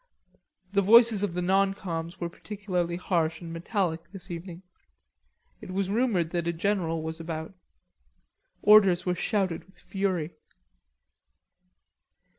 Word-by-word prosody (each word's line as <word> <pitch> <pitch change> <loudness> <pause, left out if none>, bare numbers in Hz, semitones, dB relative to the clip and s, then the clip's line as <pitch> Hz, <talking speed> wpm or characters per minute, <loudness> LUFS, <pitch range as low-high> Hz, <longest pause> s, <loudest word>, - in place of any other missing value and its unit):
The 200 - +4
voices 225 +1 +6
of 205 -4 -1
the 180 - -1
non 195 +2 +2
coms 165 -3 -5
were 175 - -2
particularly 180 -2 -3
harsh 170 -3 -1
and 165 -2 -8
metallic 170 -1 -2
this 195 -3 -10
evening. 175 +1 -7 1.0
It - - -10
was 190 +1 -2
rumoured 205 -8 +1
that 170 -1 -2
a 170 - 0
general 165 -3 -1
was 160 +1 -4
about. 160 +1 -5 1.1
Orders 200 -4 +6
were 180 - +1
shouted 185 -2 -1
with 190 - -24
fury. 185 -5 -2
180 Hz, 125 wpm, -27 LUFS, 170-195 Hz, 1.1 s, voices